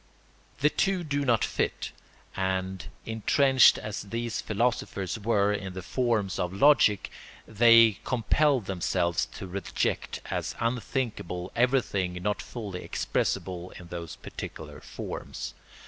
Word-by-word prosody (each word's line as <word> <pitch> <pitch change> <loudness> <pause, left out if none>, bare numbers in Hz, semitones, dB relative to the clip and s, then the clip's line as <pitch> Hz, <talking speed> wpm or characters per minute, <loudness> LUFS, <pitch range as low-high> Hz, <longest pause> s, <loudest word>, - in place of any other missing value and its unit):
The 150 +1 +4
two 185 +4 +1
do 145 -2 -1
not 120 -4 +3
fit; - - -2 0.4
and 95 -1 -2 0.2
intrenched 130 +4 +5
as 105 -1 -5
these 115 +3 -3
philosophers 110 -3 -1
were 105 -1 +2
in 95 -2 -4
the 95 -1 -6
forms 115 -4 0
of 90 - -1
logic 105 -3 +4 0.4
they 115 -1 +6
compelled 130 +1 +2
themselves 90 -2 0
to - - -6
reject 95 0 -2
as - - -2
unthinkable 115 -6 -2
everything 120 -7 +1
not 90 +4 -2
fully 100 -7 -6
expressible 90 -1 -2
in 90 -1 -12
those 85 -2 -6
particular - - -8
forms. - - -6
105 Hz, 115 wpm, -28 LUFS, 95-120 Hz, 0.4 s, they